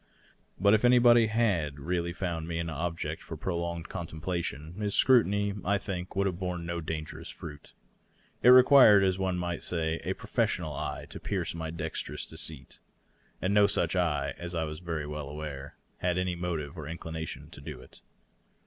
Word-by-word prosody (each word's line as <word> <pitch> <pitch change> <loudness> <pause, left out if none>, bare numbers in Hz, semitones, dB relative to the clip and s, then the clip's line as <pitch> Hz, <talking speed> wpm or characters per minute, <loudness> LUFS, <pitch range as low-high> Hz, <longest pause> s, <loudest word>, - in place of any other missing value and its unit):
But 100 +1 +5
if 110 - +3
anybody 120 -2 +6
had 100 -10 +1
really 85 +3 -1
found 85 -2 -3
me 85 -1 -3
an 85 0 -2
object 85 +2 -3
for - - -8
prolonged 85 -1 -3
contemplation, 85 -2 -4
his 105 -1 0
scrutiny 100 -5 +4
would, 100 -2 -8
I 100 +2 +2
think, 90 -2 -5
have 95 -2 0
borne 90 -2 -3
no 85 0 -3
dangerous 80 0 -5
fruit. 75 -3 -9 0.7
It 125 - +6
required, 125 -5 +8
as 95 0 +1
one 95 -1 0
might 85 -1 -3
say, 80 -2 -1
a - - -2
profes - - 0
sional 80 -4 -5
eye 75 - -4
to - - -7
pierce - - -2
my 80 -1 -4
dexterous 85 - -4
deceit. 75 -4 -8 0.6
And 95 +2 +1
no 105 0 +6
such 90 -3 +1
eye, 80 -5 +1
as 85 0 -4
I 80 - 0
was 75 0 -5
very 80 -4 -3
well 75 -1 -5
aware, 75 -2 -7 0.2
had 90 0 0
any 90 0 0
motive 85 -3 -4
or 75 - -6
inclination 80 -1 -6
to - - -11
do 75 -3 -7
it. 65 - -15
85 Hz, 175 wpm, -29 LUFS, 80-95 Hz, 0.7 s, required